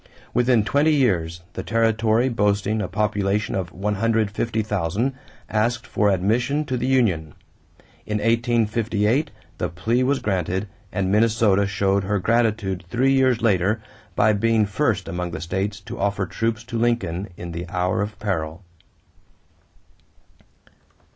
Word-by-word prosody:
Within 125 -2 +3
twenty 150 +6 +3
years, 85 - +1
the - - -4
territory, 115 +1 +2
boasting 105 -2 +1
a 100 - -2
population 105 +1 0
of 90 -3 -2
150,000, 105 +1 -1 0.3
asked 115 +3 0
for 105 -4 +1
admission 120 +10 +1
to 130 - -2
the 125 +1 -1
union. 95 - +1 0.7
In 105 - -1
1858 115 +3 +1 0.3
the - - -1
plea 110 +8 0
was 135 +2 +2
granted 95 -1 -1 0.2
and 95 -2 -1
Minnesota 105 -2 +3
showed 100 0 +1
her 100 +1 0
gratitude 105 -3 0
three 130 +5 +2
years 130 -3 +3
later 100 0 +2 0.4
by 110 - +4
being 110 +1 +2
first 105 -2 0
among 90 +1 -3
the 85 - -5
states 95 +6 -3
to - - -8
offer 100 -1 0
troops 115 +4 -2
to 115 -1 -4
Lincoln 110 -6 0
in 85 -1 -6
the 85 +1 -6
hour 90 +1 0
of 105 +1 -4
peril. 85 -3 -3
105 Hz, 130 wpm, -23 LUFS, 95-115 Hz, 0.7 s, by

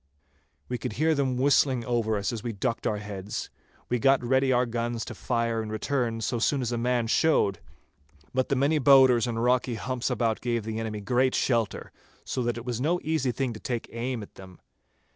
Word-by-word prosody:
We 125 -1 -3
could 110 - -4
hear 160 +7 +2
them 135 -4 0
whistling 130 -2 +3
over 115 -3 0
us 100 +4 -2
as 115 - -4
we 120 0 -4
ducked 115 +4 -2
our 105 - 0
heads. 100 -1 -6 0.4
We 125 - 0
got 135 +2 +3
ready 130 +2 +2
our 125 0 +3
guns 120 -1 -3
to - - -7
fire 115 -2 -1
in 110 - -6
return 115 +1 -1
so 120 +2 -1
soon 135 +3 +1
as 120 - -2
a 120 - -1
man 120 0 +1
showed; 115 - +2 0.7
but 130 0 0
the 140 - +2
many 145 +4 +2
bowders 130 -3 +6
and 115 -1 -2
rocky 125 0 +2
humps 130 +2 -2
about 115 -3 0
gave 120 -2 -1
the 110 +1 -4
enemy 110 -2 -4
great 125 +5 +1
shelter, 115 -5 0 0.3
so 130 - -2
that 120 -1 -1
it 120 - -7
was 120 -1 -3
no 170 +5 +1
easy 150 -5 0
thing 125 0 -2
to 110 - -9
take 120 -1 -4
aim 120 -1 -3
at - - -13
them. 95 -1 -13
120 Hz, 205 wpm, -27 LUFS, 115-130 Hz, 0.7 s, bowders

